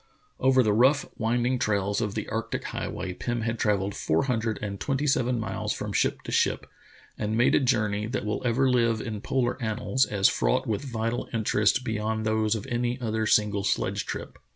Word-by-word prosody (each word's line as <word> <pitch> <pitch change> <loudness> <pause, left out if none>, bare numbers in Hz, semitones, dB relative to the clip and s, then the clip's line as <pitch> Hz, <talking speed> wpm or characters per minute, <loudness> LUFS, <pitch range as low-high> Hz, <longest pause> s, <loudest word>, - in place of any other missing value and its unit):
Over 130 -1 +4
the 105 -2 +2
rough, 130 +6 +4
winding 120 +3 +1
trails 100 -1 0
of 105 -3 -2
the - - -3
arctic - - -3
highway, 90 -1 -4
Pirn 120 +5 -3
had 115 0 -2
travelled 100 -2 +1
four 80 -3 0
hundred 115 -4 -1
and 100 -1 -5
twenty 135 +6 -1
seven 125 -4 +1
miles 100 -3 -2
from - - -5
ship - - 0
to - - -6
ship, - - +1 0.5
and 110 +1 -1
made 120 - +4
a - - +5
journey 105 -5 +1
that 120 -2 -3
will 105 0 -2
ever 125 +2 +2
live 115 -3 +2
in 110 -3 -5
polar 130 +1 -1
annals 120 +4 0
as 100 -2 +3
fraught - - +1
with 105 -2 -1
vital 115 -3 -3
interests 110 +1 +2
beyond 110 -3 -2
those 110 0 +1
of 110 - -5
any 120 0 -1
other 110 -2 -1
single 105 -2 +2
sledge - - -1
trip. - - -6
110 Hz, 190 wpm, -27 LUFS, 105-125 Hz, 0.5 s, a